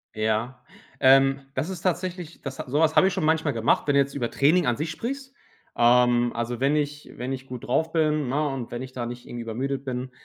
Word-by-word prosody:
Ja, 110 +4 -1 0.4
ähm, 135 +1 +5
das 135 +6 -1
ist 185 -3 -6
tatsächlich 180 -2 -3
das 135 -1 -7
ha - - -2
so 145 +4 +1
was 160 0 +3
hab 155 - +6
ich 190 - +3
schon - - -1
manchmal 160 -2 +2
gemacht, 115 0 +1
wenn 145 -1 +1
du - - +5
jetzt 140 0 +1
über 120 -4 -2
Training 160 +6 +3
an 120 -2 +1
sich 155 +1 -3
sprichst. 265 - -5 0.4
Ähm, 120 0 +4
also 120 +1 -3
wenn 140 +2 +3
ich 150 0 -3
wenn 125 +2 -3
ich 135 0 -7
gut 125 -2 -8
drauf 160 +6 +1
bin, 155 -4 +1
ne, 150 +3 +1
und 135 -4 -5
wenn 120 +1 -4
ich 130 0 -8
da 120 -2 -4
nicht 120 +1 -8
irgendwie 120 -1 -6
übermüdet 135 +4 -3
bin, 130 -1 -4
135 Hz, 235 wpm, -25 LUFS, 125-155 Hz, 0.4 s, hab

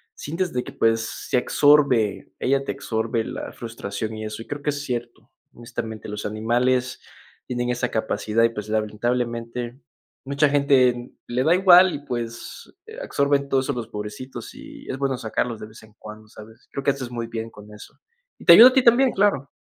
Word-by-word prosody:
sientes 170 +4 -3
de 125 0 -2
que, - - -9
pues, 115 0 +2 0.3
se - - +2
absorbe, 135 -6 +3
ella 135 +1 +1
te - - -2
absorbe 115 -3 -2
la - - -6
frustración 110 -1 -6
y 110 0 -6
eso, 110 +1 -6
y - - -11
creo 145 0 -6
que 150 - +1
es 145 0 -5
cierto. 120 -3 -6 0.2
Honestamente, 110 -2 -7
los 105 0 -6
animales 125 +4 0 0.5
tienen 120 -1 -2
esa 125 0 -1
capacidad 110 0 0
y, 115 - +4
pues, 105 -2 -7
lamentablemente 115 +3 -2 0.5
mucha 140 +2 +2
gente, 140 -3 +4
mm, 120 +1 -11
le 125 +2 -1
da 160 - +4
igual, 185 0 +6
y - - -4
pues, 120 -2 -6
eh, 445 +1 -11
absorben 140 - 0
todo 135 - +3
eso 140 +2 -2
los 115 -2 -6
pobrecitos, 105 +4 -8
y - - -12
es 130 - -3
bueno 135 -1 -1
sacarlos 115 0 -3
de - - -8
vez 110 +1 -15
en 110 -1 -18
cuando, 110 0 -11
¿sabes? 110 +2 -15
Creo 140 - -4
que, 140 - +3
haces 130 -3 -6
muy 115 -1 -4
bien 115 0 -5
con 105 +1 -14
eso. 105 - -13 0.5
Y - - -14
te 170 - +10
ayuda 235 +8 +11
a 255 - -5
ti 265 - +3
también, 250 +2 +5
claro. 195 -9 +1
120 Hz, 195 wpm, -23 LUFS, 110-140 Hz, 0.5 s, ayuda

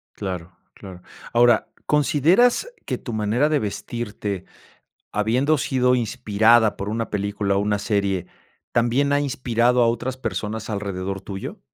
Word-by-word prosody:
Claro, 90 -4 -6 0.2
claro. 95 -2 -11 0.3
Ahora, 120 -1 +4 0.2
¿consideras 170 - +3 0.2
que - - -2
tu 120 - -7
manera 110 +7 +1
de 150 - +2
vestirte, 105 -3 -4 0.7
habiendo 125 +9 +2
sido 125 -1 +2
inspirada 110 -1 +3
por 100 - -4
una 115 +1 -3
película 100 -1 -1
o - - +3
una 105 0 0
serie, 100 -3 -1 0.5
también 125 +5 +2
ha 145 - +3
inspirado 125 -3 +1
a 115 - +5
otras 120 +3 -2
personas 110 -3 -4
alrededor 100 -2 -3
tuyo? 95 0 -7
110 Hz, 135 wpm, -23 LUFS, 100-125 Hz, 0.7 s, a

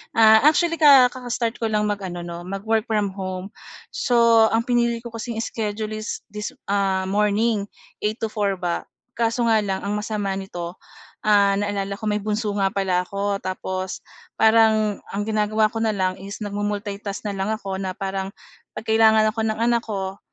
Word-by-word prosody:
actually, 290 +10 +5
ah, 275 -5 +8
ka 255 - -9
kaka-start 245 -1 -2
ko 225 - 0
lang 210 0 +1
mag-ano 195 -4 -3
‘no, 170 0 -7
mag 195 +1 -5
work 220 -1 +2
from 210 -3 0
home. 185 0 -5 0.4
So 235 - +4
ang 225 +1 +2
pinili 235 -1 +2
ko 235 - -7
kasing 230 +1 -5
iskedyul 215 -1 -3
is 215 0 -5
this, 210 0 -5 0.2
ah, 195 -2 +1
morning 210 +1 +1 0.4
8:00 215 +2 -1
to 225 - +2
4:00 205 -3 0
ba. 175 -2 -2 0.4
Kaso 230 +1 +1
nga 225 -1 +4
lang 190 -1 -2
ang 200 +1 -2
masama 210 -2 -2
nito, 175 -3 -6 0.5
ah, 200 -2 +4
naalala 200 -1 -2
ko 215 - -16
may 210 - 0
bunso 210 +1 -2
nga 195 - +3
pala 190 -2 0
ako. 200 0 -2
Tapos 185 0 -4 0.3
parang 220 -2 +4
ang 205 +1 -3
ginagawa 215 0 +1
ko 225 - -4
na 220 -1 0
lang 185 -1 -1
is 200 +2 -7
nagmu-multitask 205 0 -4
na 210 - -2
lang 195 0 -3
ako 195 -3 -3
na 185 -1 -4
parang 195 0 -3 0.5
‘pag - - -6
kailangan 220 -1 +5
ako 225 - -6
ng 215 - 0
anak 235 0 +2
ko, 195 -2 -4
210 Hz, 175 wpm, -23 LUFS, 195-225 Hz, 0.5 s, ah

